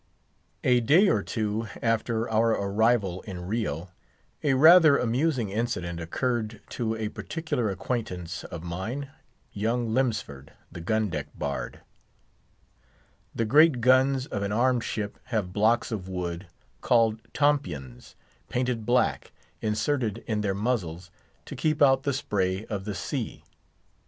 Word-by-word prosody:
A 125 -1 +4
day 160 - +5
or - - +2
two 110 0 -2
after 115 0 0
our 110 +1 +2
arrival 100 -2 +1
in 90 -4 -7
Rio, 95 -5 -2 0.5
a 140 -3 +2
rather 155 +1 +8
amusing 125 -2 0
incident 90 -6 -2
occurred 110 +5 -2
to 115 -2 -2
a 110 -1 -3
particular 155 -5 -3
acquaintance 90 -4 -4
of 85 -1 -7
mine, 110 +12 -4 0.4
young 115 +2 -1
Lemsford, 110 - -2 0.2
the 85 - -8
gun 110 +4 0
deck 75 -2 -3
bard. 70 -1 -4 1.5
The 115 - 0
great 145 +3 +5
guns 130 +2 +4
of 100 - -4
an 100 0 -2
armed 120 +2 +2
ship 105 -2 -4
have 105 -7 -2
blocks 115 +5 +2
of 95 -4 -4
wood, 90 0 -4 0.3
called 115 -2 +3
tompions, 85 - -1 0.3
painted 125 -3 -1
black, 125 +1 +1 0.3
inserted 110 +1 -1
in 110 -3 -1
their 100 -2 -1
muzzles, 95 -6 -2 0.3
to - - -8
keep 155 -1 0
out 135 -2 +5
the 140 0 -1
spray 95 -6 -1
of 100 -3 -5
the 105 -2 -4
sea. - - -4
110 Hz, 130 wpm, -27 LUFS, 95-125 Hz, 1.5 s, rather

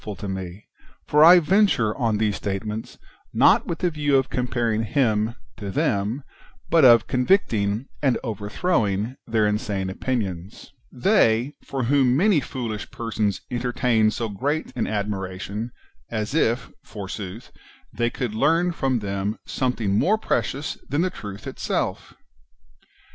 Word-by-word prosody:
f - - -18
ul 105 - -4
to 100 +2 -7
me, 95 0 -6 0.4
for 150 +1 +5
I 175 +3 +10
venture 175 - +3
on 115 -5 0
these 105 -1 +1
statements, 105 +2 -4 0.4
not - - +5
with 170 - -2
the 180 0 0
view 145 -3 +2
of 135 - 0
comparing 120 -2 0
Him 115 -2 +1 0.2
to 100 - -6
them, 100 +7 0 0.5
but 165 -2 +5
of 120 -3 +7
convicting 125 - +1 0.2
and 135 -4 +2
over 105 -4 -4
throwing 115 - 0
their 110 -2 +2
insane 105 -2 -1
opinions) 100 -1 -4
— - - -37 0.2
they, 125 - +3
for 135 -2 -3
whom 130 0 +3
many 185 -2 +4
fooHsh 115 -6 -5
persons 110 -4 -2
entertain 120 -2 +1
so 115 +1 -3
great 140 +10 -2
an 120 - -1
admiration, 100 +1 -3 0.4
as 110 +1 -3
if, 125 -6 +1
forsooth, 100 +2 -7 0.4
they 120 0 0
could 120 -3 -4
learn 165 +10 +2
from 130 -7 -1
them 100 +1 -2
something 115 -6 0
more 215 +5 +3
precious 145 -8 -2
than 145 +4 +1
the 185 +1 0
truth 100 -1 -8
itself - - -3
115 Hz, 145 wpm, -23 LUFS, 105-135 Hz, 0.5 s, I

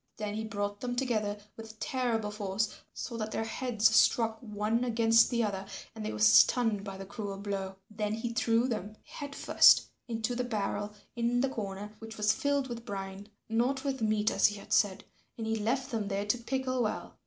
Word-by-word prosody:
Then 210 -1 -3
he 220 +1 -3
brought 205 -1 -3
them 245 -1 -2
together 215 -5 0 0.2
with 220 -1 -11
terrible 230 -5 -1
force 205 0 -2 0.2
so 235 - -6
that 215 -1 -3
their - - -1
heads 225 -1 +1
struck 225 -1 +4
one 215 +1 -1
against 230 -1 +4
the 235 -2 +1
other 195 -3 -2 0.3
and 220 -1 -7
they - - -2
were 105 - -5
stunned 200 - +5
by 195 -2 -6
the 195 - -7
cruel 200 0 -5
blow. 195 -1 -4
Then 210 0 -2
he 235 +1 -3
threw 230 +1 +2
them 215 -3 -4
head 285 -1 -8
first - - +6 0.2
into 225 0 -2
the 250 - 0
barrel 205 -3 -2 0.2
in 240 +1 +1
the 270 - +2
corner 205 -3 -5
which 225 0 -9
was 210 0 +3
filled 285 -1 0
with 235 -2 -6
brine, 195 -2 -6 0.2
not 245 +4 0
with 270 -3 -2
meat 215 -1 +2
as - - +5
he 210 - -3
had 200 - -6
said, 200 -2 +3 0.3
and 225 - -4
he 220 0 0
left 250 +5 -1
them 220 -3 -1
there 200 0 -1
to 210 +4 +1
pickle 255 +1 -1
well. 215 -2 -3
220 Hz, 200 wpm, -31 LUFS, 205-235 Hz, 0.3 s, first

